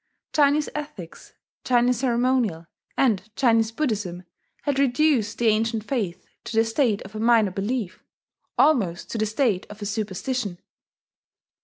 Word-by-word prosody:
Chinese 295 0 +3
ethics, 285 - -8 0.3
Chinese 245 -1 +2
ceremonial, 245 -8 +1 0.3
and 215 -6 +1
Chinese 230 -4 +3
Buddhism 210 - -2 0.4
had 285 -2 0
reduced 265 -4 +2
the 240 - -1
ancient 220 0 +2
faith 215 -8 -3 0.2
to 225 - -5
the 225 - +5
state 225 -2 +1
of 195 - -12
a 215 - -5
minor 225 -3 +4
belief 200 0 -3 0.5
almost 200 - +2
to 230 - -3
the 215 - +1
state 220 -4 0
of 210 - -11
a 205 - -5
superstition. 210 0 -3
225 Hz, 135 wpm, -24 LUFS, 205-255 Hz, 0.5 s, the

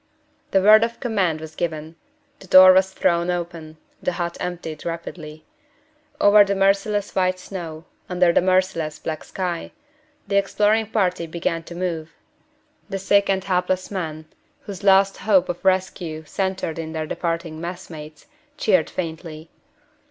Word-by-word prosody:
The 190 -1 +2
word 215 +2 +7
of 230 0 -3
command 195 -10 0
was 160 0 -9
given; 160 -1 -4 0.4
the 190 - -14
door 185 0 +9
was 190 0 +3
thrown 175 -2 +1
open; 170 -3 -5 0.2
the 180 - -1
hut 170 -1 -3
emptied 170 -4 -5
rapidly. 160 -2 -7 0.7
Over 205 0 +7
the 200 0 -1
merciless 195 +1 +1
white 185 -1 +1
snow 170 -4 -8 0.2
under 180 -1 +3
the - - +4
merciless 185 -4 0
black 155 -1 -5
sky 180 -3 -4 0.6
the 200 0 +1
exploring 210 +2 +2
party 185 -6 0
began 165 0 -2
to 170 - -9
move. 170 -3 -4 0.7
The 195 - -3
sick 200 +1 +2
and 190 -1 +1
helpless 185 0 -1
men, 160 -5 -4 0.4
whose 200 -1 -9
last 195 0 +4
hope 190 -4 +2
of 175 - -4
rescue 185 -4 0
centered 190 -1 -3
in 160 -1 -5
their 160 -1 -3
departing 165 0 -3
messmates, 170 -3 -8 0.3
cheered 185 - +2
faintly. 160 -2 -6
180 Hz, 145 wpm, -22 LUFS, 165-195 Hz, 0.7 s, door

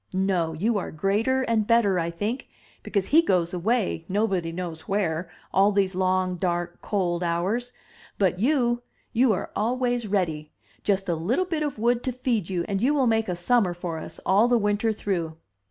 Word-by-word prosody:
No; 185 -4 +1
you 205 +7 0
are - - -5
greater 215 +11 +1
and 220 -4 +1
better, 220 -6 +3
I 165 0 -1
think, 205 +9 -4 0.3
because 200 -3 -1
he 320 +3 +6
goes 180 - +1
away 195 -1 0
nobody 190 -4 0
knows 170 -2 -6
where 175 -4 -1 0.2
all 195 +2 +5
these 195 -2 +1
long, 185 0 +1
dark, 175 0 -2
cold 180 -4 -1
hours; 190 +9 -1 0.5
but 185 -2 +1
you 240 -1 +2 0.2
— - - -40
^you 245 +1 +4
are 185 - -4
always 245 +1 0
ready; 160 -7 -1 0.3
just 195 -1 0
a 175 - +1
little 205 - 0
bit 330 -4 -2
of 295 -5 -2
wood 235 +2 +2
to 255 - 0
feed 235 -7 -1
you, 175 -3 -1
and 195 -1 -1
you 280 +5 +3
will 270 -3 +3
make 225 -3 +1
a 180 - -1
summer 180 0 +2
for 170 -2 -4
us - - -7
all 205 +5 +4
the 245 0 +4
winter 210 +1 +1
through! 175 -7 -3
200 Hz, 185 wpm, -25 LUFS, 175-235 Hz, 0.5 s, he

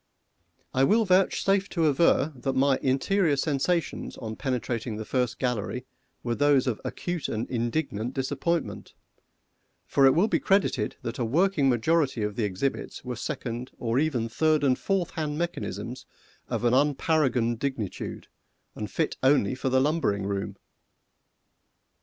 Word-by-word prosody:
I 130 - +3
will 220 +10 +4
vouchsafe 195 +1 +2
to 165 -3 0
aver 150 0 +3
that 135 +1 -2
my 135 0 +3
interior 150 +5 +2
sensations 155 +4 -1
on 110 -2 -6
penetrating 120 -3 -2
the 110 0 -5
first 125 0 -1
gallery 125 0 -2 0.4
were 120 - -1
those 145 0 +3
of 125 -5 -2
acute 175 -4 -3
and 110 +1 -2
indignant 120 -1 -2
disappointment, 145 +5 -2 0.9
for 135 -1 +5
will 170 +7 +3
it - - -4
be - - +3
credited 195 - +1
that 115 - -4
a - - +1
working 150 +3 +2
majority 135 0 +1
of 105 -1 -2
the 115 - 0
exhibits 105 +7 -3
were 125 -1 -3
second, 125 -1 -5
or 115 +1 0
even 135 -7 0
third 155 +5 +2
and 130 -2 +2
fourth 190 -4 0
hand 150 -2 -3
mechanisms 130 - -4 0.4
of - - -2
an 120 0 +3
unparagoned 135 -4 +2
dingitude, 125 -8 -4 0.5
and 105 -1 -5
fit 160 +5 -1
only 130 -6 +3
for 130 +1 -2
the 130 0 +3
lumbering 135 -9 +1
room? 100 0 -3
135 Hz, 145 wpm, -27 LUFS, 120-155 Hz, 0.9 s, for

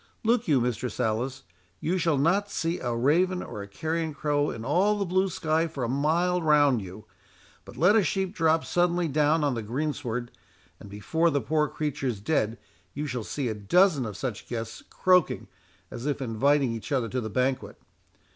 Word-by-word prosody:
Look 230 +1 +2
you, 145 -5 +4
Mistress 125 +1 -2
Alice, 125 +3 -1 0.4
you 185 +3 -1
shall 165 -4 +2
not 185 +8 +2
see 165 -3 -2
a 120 -1 -2
raven 175 +9 +2
or 105 - -7
a 100 - -7
carrion 160 +7 -3
crow 145 -1 0
in 115 0 -6
all 190 +9 +2
the 200 - -1
blue 185 +2 +1
sky 160 -1 0
for 145 -5 -5
a - - 0
mile 165 +7 +1
round 145 -6 +4
you; 95 +3 -10 0.6
but - - -12
let 180 +6 +5
a 220 - +5
sheep 190 0 -1
drop 165 -4 +2
suddenly 175 -1 +1
down 150 +2 +2
on 145 -2 +1
the 115 - -3
green 140 +8 -2
sward, 120 -3 -4 0.5
and 100 - -11
before 160 +12 0
the 145 - +1
poor 150 +5 +1
creature's 140 -7 -3
dead 110 -1 0 0.4
you 145 +2 -3
shall 125 -5 -3
see 135 +3 -3
a 110 - -1
dozen 140 - +3
of 105 -3 -7
such 120 -6 -5
guests 115 -2 -5
croaking, 180 -2 +2 0.4
as 120 +5 -5
if 145 - -1
inviting 135 +2 +2
each 115 +6 -7
other 130 -4 +1
to 125 +2 -2
the 110 - -4
banquet. 130 +4 -1
145 Hz, 190 wpm, -27 LUFS, 120-165 Hz, 0.6 s, let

